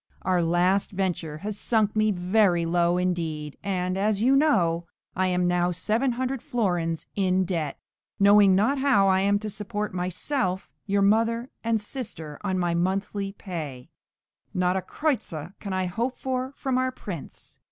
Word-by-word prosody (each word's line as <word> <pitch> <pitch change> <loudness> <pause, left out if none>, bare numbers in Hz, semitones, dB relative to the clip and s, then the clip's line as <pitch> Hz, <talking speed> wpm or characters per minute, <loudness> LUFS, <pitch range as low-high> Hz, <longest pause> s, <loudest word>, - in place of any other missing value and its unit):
Our 180 -1 +2
last 175 +4 +2
venture 180 -5 -2
has 205 +5 -5
sunk 220 -3 +1
me 215 0 +3
very 180 -2 +2
low 175 +1 +2
indeed, 165 -5 -2
and, 185 -2 -1
as 205 0 +1
you 255 +5 +4
know, 175 - +2 0.3
I 185 0 +1
am 180 -1 +1
now 175 0 +2
seven 220 +9 0
hundred 260 +1 -2
florins 175 -8 -1
in 185 -1 +2
debt, 165 -6 -2 0.4
knowing 200 -1 +6
not 260 +9 +2
how 265 -8 +4
I 190 0 +4
am 200 +1 +3
to 215 +1 -5
support 210 0 -4
myself, 185 - -2 0.2
your 200 0 +2
mother 230 +4 +2
and 230 -1 +1
sister, 205 - -7
on 190 -2 0
my 175 -2 +1
monthly 195 +3 -1
pay; 155 -11 -7 0.6
not 180 0 +2
a 190 - 0
kreuzer 185 - -3
can 200 - -6
I 185 0 0
hope 235 +8 -2
for 260 0 -2
from 260 -1 0
our 255 0 0
prince. 190 - -9
190 Hz, 160 wpm, -26 LUFS, 175-220 Hz, 0.6 s, knowing